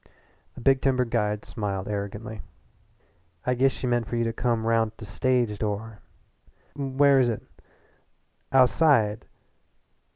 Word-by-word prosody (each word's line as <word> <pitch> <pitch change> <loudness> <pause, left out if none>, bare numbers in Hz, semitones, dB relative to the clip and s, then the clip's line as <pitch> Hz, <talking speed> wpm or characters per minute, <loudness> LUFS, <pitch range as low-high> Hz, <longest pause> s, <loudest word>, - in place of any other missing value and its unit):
The - - -10
big 135 +2 +3
timber 130 -2 +2
guide 105 -3 -1
smiled 100 -4 -4
arrogantly. 105 +1 -5 1.0
"I 125 - +2
giss 130 +2 +3
she 130 - -6
meant 120 -2 0
for - - -4
you 115 - +1
to 115 0 -1
come 115 -1 -1
roun' 115 -1 +2
t' 110 - -23
the 110 - -9
stage 120 0 0
door." 105 0 -4 0.8
"Where 140 -2 -3
where 140 0 +5
is 125 -2 +3
it?" 115 - -4 1.1
"Ou'side. 125 -5 +3
115 Hz, 140 wpm, -26 LUFS, 105-130 Hz, 1.1 s, where